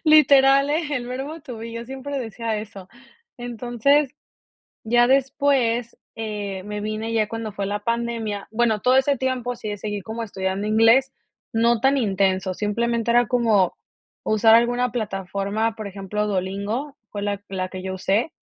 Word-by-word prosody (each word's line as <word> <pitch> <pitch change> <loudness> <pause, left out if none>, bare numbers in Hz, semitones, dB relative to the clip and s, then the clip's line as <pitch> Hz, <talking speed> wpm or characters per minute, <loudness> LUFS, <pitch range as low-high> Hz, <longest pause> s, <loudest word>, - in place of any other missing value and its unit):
Literal, 280 -3 +6
eh, 310 +3 +1
el 255 -4 -2
verbo 270 +6 -5
to 250 -5 -8
be 230 +1 -7
yo 230 0 -5
siempre 270 +3 -5
decía 230 -2 -3
eso. 210 -3 -8 0.5
Entonces, 245 +4 +1 0.7
ya 240 +2 +4
después, 260 -3 +1 0.2
eh, 205 -4 -4
me 210 +1 -5
vine 215 +2 -3
ya 220 -2 +2
cuando 225 0 -5
fue 200 0 -4
la 205 +1 -2
pandemia 230 -3 -2
bueno, 220 -1 +1
todo 255 +1 +4
ese 270 +1 +3
tiempo 250 -1 -2
sí - - -7
le 205 - -4
seguí 205 0 -4
como 225 +4 -5
estudiando 190 -1 -3
inglés, 225 +5 +4 0.4
no 230 +1 +3
tan 270 +2 +3
intenso, 190 -4 +1
simplemente 230 +4 0
era 240 0 +4
como 220 -7 +2 0.5
usar 220 +1 +5
alguna 245 +1 +2
plataforma, 205 0 -2
por 215 -2 -6
ejemplo, 200 +2 -3
Duolingo, 200 +8 -2 0.2
fue 205 - -5
la 200 -1 -2
la 185 -1 -3
que 185 0 -7
yo 190 0 -3
usé 205 - 0
225 Hz, 160 wpm, -23 LUFS, 205-245 Hz, 0.7 s, Literal